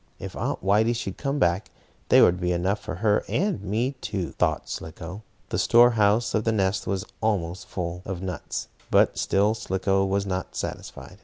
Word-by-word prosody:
"If - - -8
Aunt - - -3
Whitey 110 +5 +3
should 95 -5 -5
come 140 0 -1
back, 95 -5 +1 0.4
there - - +7
would 90 +1 +4
be 90 0 +1
enough 95 +4 0
for 95 - -6
her 105 +2 +2
and 195 - 0
me 110 +6 -1
too," 95 -4 -3
thought - - 0
Slicko. 85 +5 -7 0.3
The - - -1
store 120 +1 +6
house 110 +1 +2
of 110 - +1
the 115 - +1
nest 95 -2 0
was 95 +1 -1 0.2
almost 95 -5 -1
full 90 -1 -4
of 95 -2 -5
nuts, 90 -2 -4 0.2
but - - +4
still 105 +2 +2
Slicko 95 -2 0
was 100 +1 0
not 95 -1 -4
satisfied. - - -6
100 Hz, 180 wpm, -25 LUFS, 90-110 Hz, 0.4 s, there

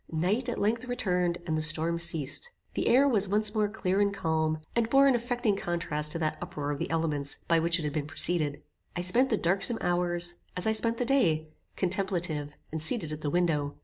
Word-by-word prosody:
Night 195 +10 0
at 240 - -3
length 225 +4 0
returned, 180 -8 0
and 160 - -1
the 155 - 0
storm 160 +2 +1
ceased. 165 - 0 0.2
The - - -1
air 270 +4 +5
was 210 -7 +2
once 210 +1 +2
more 210 -2 +1
clear 200 -2 0
and 200 0 +2
calm, 160 -4 0 0.2
and 235 -1 +1
bore 275 +2 +5
an 275 - +5
affecting 240 -3 0
contrast 170 -5 -2
to - - -2
that 155 -1 -2
uproar 145 -1 -4
of 145 - -4
the - - -3
elements 155 -3 -1
by 165 -1 +4
which 170 +1 +2
it 165 - -4
had 150 -1 -2
been 150 -2 -2
preceded. 155 -2 0 0.3
I 175 - -2
spent 240 +9 +3
the 220 - +2
darksome 195 +7 +1
hours, 175 0 0 0.2
as 180 - 0
I 220 - +3
spent 230 +1 +1
the 245 - 0
day, 165 - +2 0.3
contemplative 175 -6 -1 0.2
and 160 0 -3
seated 160 0 +2
at 155 0 -6
the 150 - -1
window. 150 -4 0
175 Hz, 215 wpm, -29 LUFS, 155-215 Hz, 0.3 s, air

